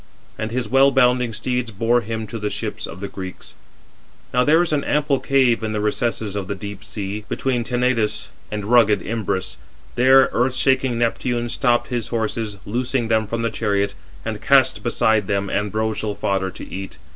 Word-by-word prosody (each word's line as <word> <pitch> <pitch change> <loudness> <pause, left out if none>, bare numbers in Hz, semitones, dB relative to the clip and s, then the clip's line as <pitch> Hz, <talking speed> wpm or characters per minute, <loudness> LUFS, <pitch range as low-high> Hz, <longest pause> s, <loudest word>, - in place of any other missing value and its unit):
And 110 - -3
his 120 +1 -2
well 135 +2 +5
bounding 125 -2 +3
steeds 125 +2 -2
bore 115 +3 +1
him 110 0 -4
to 110 +2 -6
the 105 0 -2
ships - - -4
of - - -9
the 100 - -3
Greeks. 95 -2 -8 0.8
Now 125 0 +4
there 160 +5 +5
is 165 - -2
an 145 -2 +1
ample 145 -2 +1
cave 130 -4 +3
413 110 - -4
in 110 - -3
the 105 - -1
recesses 105 -1 -1
of 100 -2 -3
the 100 - -3
deep 100 0 -8
sea, 105 0 -5
between 125 -3 -1
Tenedos 120 -3 0 0.2
and 105 -1 -4
rugged 110 -4 +4
Imbrus. 95 -4 -2 0.4
There 130 +2 +6
earth 125 +2 +1
shaking 130 -2 +2
Neptune 120 0 0
stopped 120 0 +1
his 120 -3 -2
horses, 110 -2 -2
loosing 120 +2 -1
them 110 -1 +2
from 115 +2 -2
the 115 - 0
chariot, 100 -3 0 0.3
and - - -4
cast - - +4
beside 110 -3 +2
[them] 100 0 -1
ambrosial 105 +1 -1
fodder 95 -1 -1
to - - -9
eat. 95 0 -7
115 Hz, 180 wpm, -21 LUFS, 105-125 Hz, 0.8 s, There